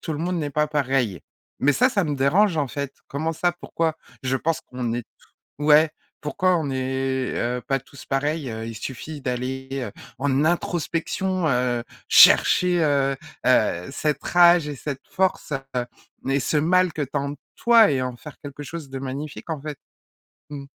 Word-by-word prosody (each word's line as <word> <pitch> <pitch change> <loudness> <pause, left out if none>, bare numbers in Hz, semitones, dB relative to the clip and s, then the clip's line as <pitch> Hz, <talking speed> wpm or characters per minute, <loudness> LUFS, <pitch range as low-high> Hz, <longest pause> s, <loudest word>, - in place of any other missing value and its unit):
tout 160 - -4
le 145 - -4
monde 180 +3 -1
n'est 145 -2 -2
pas 150 +2 +1
pareil». 135 - 0 0.4
Mais 145 +1 +4
ça, 255 - +4
ça 200 -6 +1
me 145 -2 -2
dérange, 165 +7 +3
en 145 -2 +1
fait. 140 +1 -4 0.2
Comment 155 +4 -2
ça? 175 +2 +1
Pourquoi? 165 -2 -2 0.3
Je 130 +1 +1
pense 165 +3 -1
qu'on 125 -2 -4
est 120 -1 -3 0.3
to 145 - -10
ouais! 155 +1 +6 0.3
Pourquoi 180 +5 +1
on 155 - -2
n'est, 130 0 -1
heu, 125 +1 -1
pas 135 -1 0
tous 140 +1 -14
pareils? 145 +1 -1
Heu, 110 0 -5
il 115 - -6
suffit 140 +5 -6
d'aller, 130 +1 -3
heu, 125 -7 -3 0.3
en 140 +1 +1
introspection, 175 +1 -1
heu, 125 -2 +1 0.3
chercher, 180 -1 +6
heu, 140 -2 +2 0.3
heu, 85 +1 +3
cette 150 0 -1
rage 175 -3 +5
et 145 - -5
cette 140 0 -6
force 190 -4 0 0.8
et 135 +1 +2
ce 150 - 0
mal 180 +3 +3
que 150 - -3
tu 135 - -5
as - - +3
en 140 +1 -3 0.2
toi 230 -4 +6
et 130 -2 0
en 125 -1 -3
faire 150 +3 -12
quelque 145 0 -8
chose 155 0 -7
de 135 - -5
magnifique, 140 +5 -6
en 155 -3 -3
fait. 150 -1 -6 0.7
Mmh. 145 -2 -7
145 Hz, 180 wpm, -23 LUFS, 130-160 Hz, 0.8 s, ouais